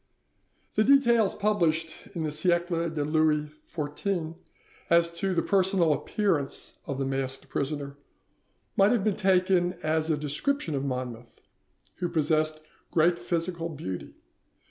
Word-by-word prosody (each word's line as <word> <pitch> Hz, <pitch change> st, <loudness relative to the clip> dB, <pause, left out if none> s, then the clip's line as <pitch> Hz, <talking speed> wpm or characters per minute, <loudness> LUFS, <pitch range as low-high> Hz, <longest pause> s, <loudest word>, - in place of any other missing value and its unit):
The 215 Hz, -, +3 dB
details 235 Hz, -6 st, +4 dB
published 165 Hz, -6 st, 0 dB
in 165 Hz, -, -2 dB
the 155 Hz, -, -1 dB
'Siecle 170 Hz, +1 st, +1 dB
de 150 Hz, -2 st, -1 dB
Louis 155 Hz, -1 st, +2 dB, 0.2 s
XIV' 160 Hz, +2 st, -2 dB, 0.6 s
as 170 Hz, 0 st, +4 dB
to 195 Hz, -1 st, 0 dB
the 165 Hz, -, +2 dB
personal 190 Hz, -5 st, +3 dB
appearance 160 Hz, -3 st, -1 dB
of 140 Hz, -, -3 dB
the 135 Hz, -, -1 dB
masked 135 Hz, 0 st, -3 dB
prisoner 140 Hz, 0 st, -3 dB, 0.8 s
might 195 Hz, +3 st, +5 dB
have 230 Hz, -5 st, +1 dB
been 210 Hz, -2 st, +1 dB
taken 185 Hz, -1 st, +3 dB
as 155 Hz, +1 st, 0 dB
a 155 Hz, -, +2 dB
description 155 Hz, -, -1 dB
of 135 Hz, -1 st, -1 dB
Monmouth, 125 Hz, -3 st, -5 dB, 0.6 s
who 175 Hz, -1 st, -2 dB
possessed 155 Hz, -1 st, +1 dB, 0.3 s
great 170 Hz, +1 st, +3 dB
physical 170 Hz, 0 st, -2 dB
beauty. 135 Hz, -, -6 dB
165 Hz, 130 wpm, -28 LUFS, 150-185 Hz, 0.8 s, might